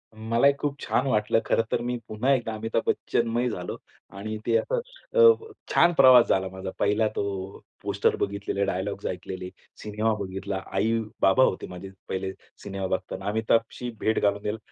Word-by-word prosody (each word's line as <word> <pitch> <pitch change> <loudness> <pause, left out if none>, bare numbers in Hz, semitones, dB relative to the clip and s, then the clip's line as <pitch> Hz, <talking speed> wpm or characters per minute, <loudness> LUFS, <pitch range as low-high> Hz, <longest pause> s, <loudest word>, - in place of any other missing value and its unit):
मलाही 115 +5 +3
खूप 145 -1 -1
छान 130 - 0
वाटलं. 110 -2 +2
खरं 115 - +2
तर - - +1
मी 125 0 -2
पुन्हा 110 +6 0
एकदा 120 -4 -1
अमिताभ 115 +1 -1
बच्चनमय 120 +1 0
झालो 90 -5 -5 0.4
आणि 110 +2 -4
ते 115 - +2
असं - - -1 0.4
अ, 460 -2 +6 0.2
छान 175 +1 +5
प्रवास 130 -5 +7
झाला 95 0 +2
माझा 95 0 -6
पहिला 105 +2 +2
तो - - 0 0.6
पोस्टर 100 0 +1
बघितलेले, 100 0 -1
डायलॉग्स 100 +2 -3
ऐकलेले, 90 0 -5 0.3
सिनेमा 110 +1 0
बघितला. 95 0 -4
आई-बाबा 110 +1 +2
होते 95 - 0
माझे 90 +1 -8 0.2
पहिले 95 0 -2 0.3
सिनेमा 95 -1 -4
बघताना. 95 - -7
अमिताभशी 115 +3 0
भेट 110 - +1
घालून 100 0 +1
द्याल 105 +1 -2
110 Hz, 155 wpm, -26 LUFS, 100-115 Hz, 0.6 s, प्रवास